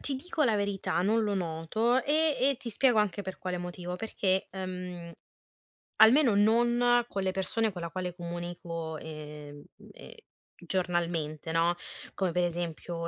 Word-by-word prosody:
ti 280 - -2
dico 305 +2 -1
la 225 -4 +3
verità, 200 -3 -1
non 220 +3 +2
lo 205 -1 0
noto, 190 +8 0
e 305 0 +2
e 270 0 +3
ti 235 - -7
spiego 245 +1 +3
anche 205 -1 +1
per 190 0 -6
quale 185 -1 -3
motivo: 175 0 -5
perché, 190 -3 0
ehm, 180 -2 -6 0.9
almeno 230 +2 +7
non 240 +3 +4
con 195 -4 -3
le 190 - +1
persone 210 +4 0
con 180 -2 -7
la 170 - -4
quale 180 0 -4
comunico, 170 -2 -5
ehm, 150 -2 -9 0.3
ehm, - - -12 0.5
giornalmente, 170 -4 -1
no, 165 +1 +3 0.4
come 190 -3 0
per 180 +1 +1
esempio: 170 0 -3
185 Hz, 150 wpm, -29 LUFS, 170-220 Hz, 0.9 s, almeno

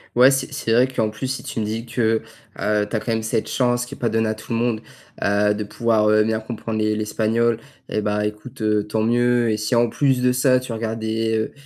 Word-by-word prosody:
Ouais, 125 +3 +7
c'est 135 0 -1
c'est 140 -6 -2
vrai 125 +3 +5
qu'en 115 -4 -1
plus, 110 +5 -5
si 130 +1 -4
tu - - -4
me 110 - -1
dis 110 +2 -3
que, 115 -1 +1 0.4
heu, 105 0 +1
tu - - -3
as - - +1
quand 120 - -7
même 110 0 0
cette 110 0 -1
chance, 120 -1 +1
qui 140 - -9
est - - -17
pas 115 - 0
donnée 110 0 +1
à 110 - 0
tout 110 +2 -11
le 115 - +1
monde, 115 -2 0 0.4
heu, 105 +1 +3
de 105 0 -3
pouvoir, 105 +1 +1
heu, 110 0 +5
bien 110 0 0
comprendre 110 0 -4
l'es 110 0 +1
l'espagnol 110 +2 +1 0.3
et 105 - -1
bah, 105 0 0
écoute, 105 +4 -7
heu, 105 -1 +1
tant 110 0 0
mieux 120 0 +2
et 105 - 0
si, 105 +3 -1
en 120 0 +3
plus 135 0 +1
de 125 0 +3
ça, 130 0 +3
tu 125 -2 -7
regardes 115 0 -3
des 110 0 -1
110 Hz, 250 wpm, -22 LUFS, 110-120 Hz, 0.4 s, Ouais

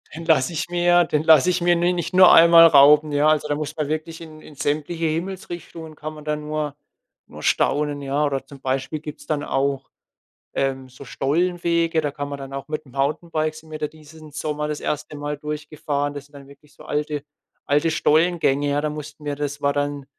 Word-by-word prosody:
Den 165 +1 -7
lasse 160 -3 +3
ich 160 - -3
mir 175 0 +3
den 150 -2 -1
lasse 160 +1 +6
ich 180 0 0
mir 175 0 +3
ni 175 +1 +1
nicht 175 +1 -4
nur 185 0 +8
einmal 165 0 +8
rauben. 150 0 +6
Ja, 145 +1 +3
also, 155 -1 +1
da 145 - 0
muss 150 +1 -5
man 155 -2 -1
wirklich 155 +2 -4
in 155 -1 -11
in 150 - -14
sämtliche 155 +4 -2
Himmelsrichtungen 165 -1 -5
kann 155 +1 -7
man 150 -1 -12
dann 150 0 -2
nur 150 -1 -3 0.5
nur - - -12
staunen, 145 0 +1
ja. 140 +2 0
Oder 135 -2 -2
zum 140 0 -13
Beispiel 135 +3 -2
gibt 150 0 -9
es - - -14
dann 150 -2 -1
auch 135 -1 -1 0.6
ähm, 135 -1 -2
so 130 +2 -12
Stollenwege, 170 +3 0
da 145 - -1
kann 145 0 -6
man 140 0 -6
dann 135 0 -9
auch 135 +1 -6
mit 155 0 -4
dem 130 - -18
Mountainbike 155 +3 -1
sind 155 0 -14
wir 155 - -6
da 150 - -1
diesen 155 0 -15
Sommer 150 0 -3
das 150 -1 -4
1. 150 0 -4
Mal 145 0 -4
durchgefahren. 150 -1 -3
Das 145 -1 -8
sind 145 - -27
dann 140 -1 -13
wirklich 140 +1 -19
so - - -15
alte 150 0 -2 0.4
alte 150 +3 +2
Stollengänge, 155 -3 +2
ja? 145 +1 +1
Da 150 - -1
mussten 150 0 -9
wir 145 -1 -3
das 145 0 -4
war 140 0 +2
dann 145 0 -2
150 Hz, 215 wpm, -22 LUFS, 145-160 Hz, 0.6 s, nur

